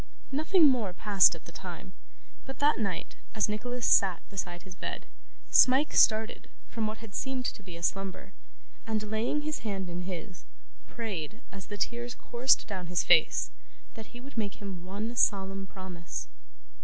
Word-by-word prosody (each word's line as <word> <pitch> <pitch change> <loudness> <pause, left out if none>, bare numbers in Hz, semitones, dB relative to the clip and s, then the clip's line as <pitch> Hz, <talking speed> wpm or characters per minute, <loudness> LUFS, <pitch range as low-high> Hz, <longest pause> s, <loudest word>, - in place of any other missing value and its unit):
Nothing 315 +5 +4
more 235 -9 +2
passed 200 0 +5
at - - -13
the - - -10
time, - - -8 0.5
but 270 - -6
that 290 -2 +3
night, 195 -5 -3 0.2
as 215 - +2
Nicholas 245 +3 -3
sat 185 -4 +4
beside 175 -3 -5
his 185 -1 -10
bed, - - -5 0.5
Smike 265 +4 +6
started 220 +1 +3 0.2
from 225 -2 -2
what 215 +1 -4
had 225 -3 -11
seemed 265 0 -2
to - - -3
be 180 -3 -9
a 170 - -11
slumber, 195 +1 -2 0.5
and 215 -1 -2
laying 235 +7 0
his 305 0 -2
hand 195 -4 -3
in 175 +1 -4
his, 180 0 -6 0.4
prayed, 215 - -5
as 195 -2 -9
the 205 - -6
tears 240 +4 -2
coursed 245 +2 +2
down 185 -4 -5
his 175 0 +1
face, 165 -3 +4 0.4
that 220 -1 -9
he 245 - -11
would 260 -2 -6
make 205 -2 -2
him 195 -4 -7
one 210 +5 -4
solemn 195 -3 +1
promise. 180 -3 -6
210 Hz, 165 wpm, -30 LUFS, 185-240 Hz, 0.5 s, Smike